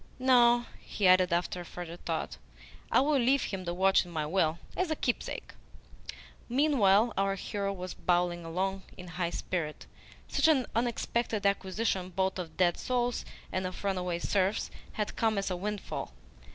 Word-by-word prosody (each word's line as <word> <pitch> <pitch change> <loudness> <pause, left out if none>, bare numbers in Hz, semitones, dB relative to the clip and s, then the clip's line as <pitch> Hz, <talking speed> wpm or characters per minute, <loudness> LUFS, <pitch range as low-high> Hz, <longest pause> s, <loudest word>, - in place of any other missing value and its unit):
"No," 240 -2 +5
he 200 - 0
added 185 0 +5
after 175 +1 -1
further 175 -1 -7
thought. 160 - -4 0.5
"I - - +5
will 285 0 +3
leave 260 +3 +3
him 190 -2 -4
the 175 - -2
watch 190 +1 +4
in 175 - -12
my 155 -3 -2
will, 160 -1 +1 0.2
as 370 -2 0
a 315 - 0
keepsake." 245 -4 -3 1.0
Meanwhile 235 -6 +4
our 195 0 +1
hero 200 +1 -3
was 185 -2 -6
bowling 175 -1 0
along 190 +4 -2 0.2
in 180 0 -9
high 175 -1 -2
spirit. 170 -3 -3 0.4
Such - - +2
an 280 -6 +4
unexpected 235 -2 -1
acquisition 195 -1 0
both 190 +1 -1
of 165 -3 -7
dead 175 -2 +3
souls 245 -1 -1 0.3
and 185 0 -1
of 185 - -8
runaway 180 -3 -1
serfs 190 +3 0 0.2
had 210 -1 -3
come 220 -2 +1
as 195 -1 -1
a - - 0
windfall. 205 - -4
190 Hz, 160 wpm, -30 LUFS, 180-230 Hz, 1.0 s, No